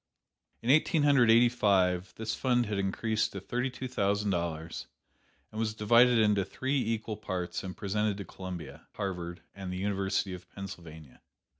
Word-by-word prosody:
In 120 - +3
Eighteen 155 +1 +4
Hundred 140 -5 +5
Eighty 115 +2 +7
five, 95 -6 +2
this 110 0 -3
fund 125 -2 +1
had 105 -2 -2
increased 110 +3 0
to 100 - -4
thirty 125 +7 -2
two 130 +1 -6
thousand 100 -3 0
dollars, 85 -2 -3 0.6
and 110 - -6
was 110 -1 -1
divided 120 +3 +5
into 105 -3 +3
three 130 +8 -1
equal 110 -1 -2
parts 90 -4 -4
and 95 -1 -6
presented 105 0 0
to 100 - -6
Columbia, 95 -3 -8
Harvard 90 -3 -4
and 95 -2 -6
the 90 - -4
University 95 0 -1
of 90 -1 -10
Pennsylvania. 80 -7 -10
100 Hz, 160 wpm, -30 LUFS, 90-115 Hz, 0.6 s, Eighty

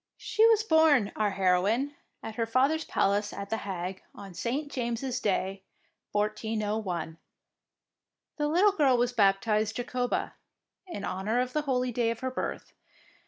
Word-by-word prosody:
She 440 +1 +3
was 445 -2 +4
born, 315 - +4
our 215 -1 +1
heroine, 195 +8 +1 0.3
at 225 - -6
her 230 +1 -2
father's 275 +7 +2
palace 205 +1 +1
at 200 +1 -7
The 225 - +1
Hague 185 -2 -5
on 195 -2 -10
St. 275 - -3
James' 250 0 -2
Day, 195 -3 -1 0.5
1401. 210 -5 -2 1.2
The 295 -1 0
little 360 +7 +4
girl 285 -9 +3
was 245 +1 +1
baptised 215 0 +2
Jacoba, 245 0 -2 0.5
in 205 - -5
honour 210 +6 -1
of 250 0 -1
the 300 - +1
holy 255 -3 0
day 235 -1 +1
of 230 0 -4
her 260 0 -2
birth. - - -5
230 Hz, 145 wpm, -28 LUFS, 200-260 Hz, 1.2 s, was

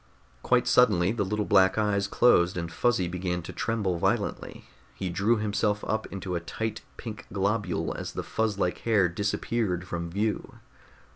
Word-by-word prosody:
Quite - - +2
suddenly 90 +2 +4
the 115 -2 -1
little 105 +2 -1
black 95 -2 +4
eyes 100 -2 +1
closed 90 -6 +4
and 85 -1 -3
Fuzzy 95 +1 +1
began 90 0 -3
to - - -8
tremble 105 -7 -1
violently. - - -1 0.3
He 95 - -3
drew 100 +6 +2
himself 105 0 0
up 110 0 -1
into 95 -1 -5
a 85 - 0
tight 110 +6 -4 0.2
pink 110 -3 -8
globule 100 -1 -1
as - - -6
the - - -4
fuzz 110 -2 -1
like 90 -3 0
hair 105 -5 +3
disappeared 100 0 -1
from 85 -1 -4
view. 105 +4 -2
100 Hz, 160 wpm, -27 LUFS, 90-110 Hz, 0.3 s, suddenly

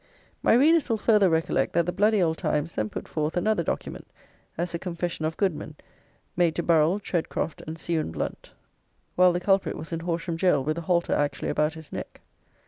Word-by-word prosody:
My - - +4
readers 305 +4 +4
will 225 - +2
further 210 -3 +4
recollect 160 0 0
that 170 0 +2
the 180 - -1
bloody 210 0 +3
old 160 -1 0
Times 150 +3 -1
then 110 0 -2
put - - -7
forth 155 +2 -2
another 210 +1 +1
document 165 - -4 0.5
as 175 +1 -2
a 170 - -2
confession 170 -2 -3
of 160 +1 -3
Goodman, 155 -6 -2 0.6
made 170 -2 +2
to 170 - -1
Burrell, 165 +3 +3
Tredcroft, 165 -4 -3
and 160 +1 -5
Scawen 165 -1 -1
Blunt, 80 - -5 0.7
while 180 0 +6
the 175 - -1
culprit 195 +1 +1
was 160 - -8
in 165 - -2
Horsham 170 0 -3
jail 165 -6 +2
with 155 +4 -1
a 170 - -10
halter 175 -1 +2
actually 145 -2 -1
about 150 +1 0
his 160 -1 -11
neck. - - -7
170 Hz, 195 wpm, -26 LUFS, 160-185 Hz, 0.7 s, while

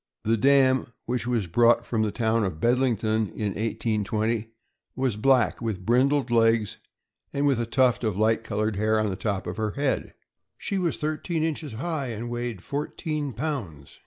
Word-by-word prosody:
The 115 +1 +2
dam, 130 0 +3
which 120 -1 -2
was 120 -5 0
brought 115 +6 +3
from 115 -2 -1
the 110 -1 +1
town 115 0 +1
of 90 -6 -3
Bed 120 +7 +3
lington, 110 -4 +1
in 105 -2 -1
1820, 110 +1 -1 0.5
was 130 -4 0
black, 120 -2 +2
with 105 -6 -3
brindled 130 +2 +2
legs, 115 -2 +3 0.5
and 140 +1 0
with 135 -4 +2
a 115 - -1
tuft 125 0 +2
of 105 -4 -1
light 110 +1 +2
colored 110 -1 -1
hair 110 +1 +2
on 105 -2 0
the - - -3
top 100 -1 -2
of 90 +3 -5
her 110 -2 -1
head; 140 -1 -1 0.4
she 195 - -2
was 175 -3 0
thirteen 155 +2 -2
inches 155 -4 -3
high, 145 +3 -3
and 120 +1 -5
weighed 120 -5 -4
fourteen 150 0 -3
pounds. 120 - -5
115 Hz, 175 wpm, -26 LUFS, 110-135 Hz, 0.5 s, dam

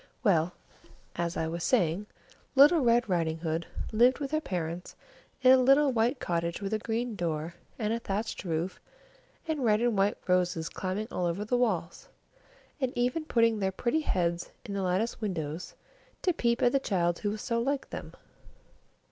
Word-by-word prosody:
Well, 175 -5 +3 0.6
as 170 0 -2
I 160 - 0
was 170 +1 -4
saying, 200 -4 +1 0.5
Little 290 +5 +7
Red 240 -3 +3
Riding 165 -4 0
Hood 165 0 -3 0.2
lived 240 +4 +4
with 280 -1 -4
her 310 0 +1
parents 175 - -4 0.5
in 255 - +8
a 260 - +8
little 275 +2 +5
white 240 +3 +1
cottage 170 0 -2
with 200 +1 -3
a 215 - +1
green 230 +1 -2
door 165 -2 -2 0.2
and 215 -2 -1
a 230 - -1
thatched 215 +1 -3
roof, 170 +1 -2 0.7
and 310 -4 -1
red 215 -2 +4
and 240 -1 +1
white 195 +1 +2
roses 180 -3 +1
climbing 190 +3 -3
all 180 - -1
over 180 +5 -2
the 245 - 0
walls, 210 -9 -1 0.7
and 260 -3 0
even 250 +6 0
putting 230 -6 +2
their 190 -1 0
pretty 240 +10 0
heads 175 - -1 0.2
in 200 -4 -5
at - - -1
the - - -1
latticed 190 +6 -1
windows, 165 -5 -4 0.5
to 360 - +3
peep 235 -5 +1
at 245 - +5
the 275 - +3
child 175 -8 0
who 205 - -1
was 210 0 -4
so 235 -2 0
like 275 +2 -2
them. - - -7
210 Hz, 180 wpm, -29 LUFS, 175-245 Hz, 0.7 s, in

